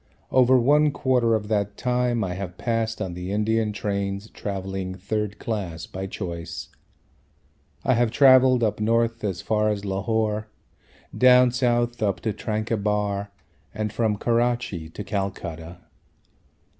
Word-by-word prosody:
Over 130 0 +5
one 145 +5 +4
quarter 125 -5 +2
of 105 -1 -3
that 105 -2 -1
time 125 -2 0
I 90 -2 -2
have 90 -1 -6
passed 115 -1 -1
on 90 -2 -5
the 90 +2 -5
Indian 110 +1 +1
trains 100 0 -3
travelling 95 -2 -4
third 105 +2 -3
class 95 -7 -4
by 95 +1 -6
choice. 85 -4 -6 1.1
I 130 - +3
have 120 -1 +2
travelled 130 0 +6
up 110 -1 0
north 115 +1 +1
as 95 -2 -3
far 105 0 +1
as 105 -1 -2
Lahore, 110 +2 -1 0.7
down 125 -1 +6
south 120 -1 0
up 100 -3 0
to 110 - -1
Tranquebar, 105 -2 -1 0.5
and 105 0 -2
from 110 -2 0
Karachi 120 -8 0
to 105 - -7
Calcutta. 90 -4 -4
105 Hz, 130 wpm, -24 LUFS, 100-120 Hz, 1.1 s, travelled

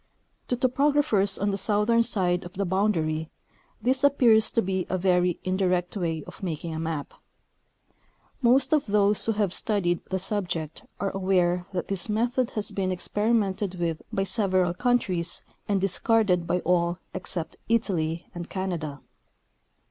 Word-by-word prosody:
To 245 - -1
topographers 255 -6 +2
on 205 +1 0
the 195 - 0
southern 210 +3 +3
side 180 -5 +1
of 175 - -10
the 200 +1 -2
boundary 165 -5 0 0.5
this 260 +2 +1
ap 285 0 +4
pears 220 -3 +5
to 230 - +2
be 190 -1 -2
a 185 - 0
very 180 -1 +2
indirect 185 -1 0
way 165 -5 -2
of - - -12
making 165 -2 -4
a 160 - -4
map. 160 -3 -4 1.3
Most 260 +3 +4
of 300 -4 +2
those 205 0 +2
who 225 - +1
have 205 -4 0
studied 180 -6 +1
the 190 - 0
subject 180 -5 -3 0.2
are 195 - -1
aware 180 -2 +1
that 185 -2 -3
this 195 0 -3
method 240 +3 +1
has 210 - -1
been 190 -1 -1
experimented 205 0 0
with 170 -3 -2
by 195 - 0
several 185 -3 +1
countries 185 -6 -1 0.2
and 200 -2 +1
discarded 195 -2 +2
by 180 0 0
all 175 -1 +1 0.2
except 175 -4 -5
Italy 175 -7 0
and 175 0 -7
Canada. 165 -7 -4
190 Hz, 150 wpm, -26 LUFS, 175-215 Hz, 1.3 s, pears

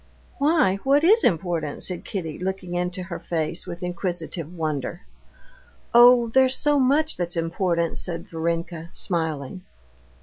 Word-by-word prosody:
"Why, 280 - +3
what 275 +7 +2
is 430 +7 +5
important?" 165 -4 0
said 180 -2 -3
Kitty, 165 -7 -5
looking 185 -1 -4
into 180 +1 -2
her 175 -1 -6
face 165 0 -3
with 175 +2 -7
inquisitive 175 -2 -4
wonder. 160 0 -3 0.9
"Oh, 240 0 +7
there's 260 +2 +4
so 295 -1 +2
much 290 +5 +2
that's 175 -1 -3
important," 170 0 -1
said 170 -2 -6
Varenka, 165 0 -3
smiling. 160 -1 -3
175 Hz, 130 wpm, -24 LUFS, 165-225 Hz, 0.9 s, Oh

